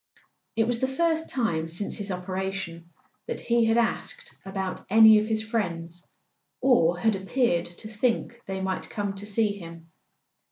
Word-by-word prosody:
It 225 0 +3
was 235 0 +1
the 260 - +1
first 320 +3 0
time 170 -11 0
since 175 +5 -2
his 205 0 -3
operation 185 -2 -4 0.4
that 470 - -3
he 235 -1 +2
had 225 +1 +3
asked 235 -1 -1
about 190 -1 -4
any 220 +1 +8
of 215 - -2
his 220 -1 0
friends, 175 -6 -3 0.5
or 180 -10 +4
had 220 +3 +2
appeared 195 -2 +1
to 175 +5 -8
think 235 +2 -1
they 190 0 -3
might 190 -1 -2
come 205 -2 -3
to 200 +1 -7
see 215 0 +2
him. 165 -1 -11
205 Hz, 160 wpm, -26 LUFS, 180-230 Hz, 0.5 s, any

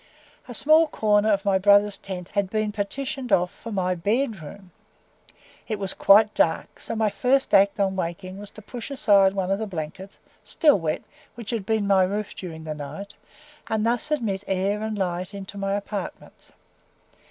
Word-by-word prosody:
A 245 - -7
small 315 +5 +5
corner 215 -5 +2
of 200 -1 0
my 195 -1 +3
brother's 205 +1 +4
tent 180 -2 -7
had 200 -2 -1
been 215 0 -1
partitioned 250 +5 -4
off 180 0 +3
for 230 - -10
my 185 -3 0
BED 210 - -1
ROOM; 180 +5 -11 1.0
it 215 - -2
was 195 -1 0
quite 210 +2 +5
dark, 160 - 0
so - - -5
my 215 -2 +1
first 265 +4 +1
act 200 +1 +5
on 195 -1 +1
waking 185 +2 -4
was 205 0 -9
to 215 - -13
push 240 +3 -8
aside 200 -8 +4
one 190 -1 -1
of 195 - +1
the 220 - -3
blankets, 185 +2 -7 0.3
still 295 -10 +3
wet, 155 -2 -2 0.3
which 235 -1 -7
had 220 -5 -3
been 220 -2 +1
my 195 -1 +4
roof 205 +2 -1
during 160 -4 -8
the 155 -1 -4
night, 150 +7 -8 0.5
and 220 -1 0
thus 240 +5 0
admit 220 -10 -1
air 195 +2 0
and 220 -1 -3
light 180 +1 -3
into 195 0 -8
my 195 0 -1
apartments. 200 -2 -7
200 Hz, 180 wpm, -24 LUFS, 190-220 Hz, 1.0 s, small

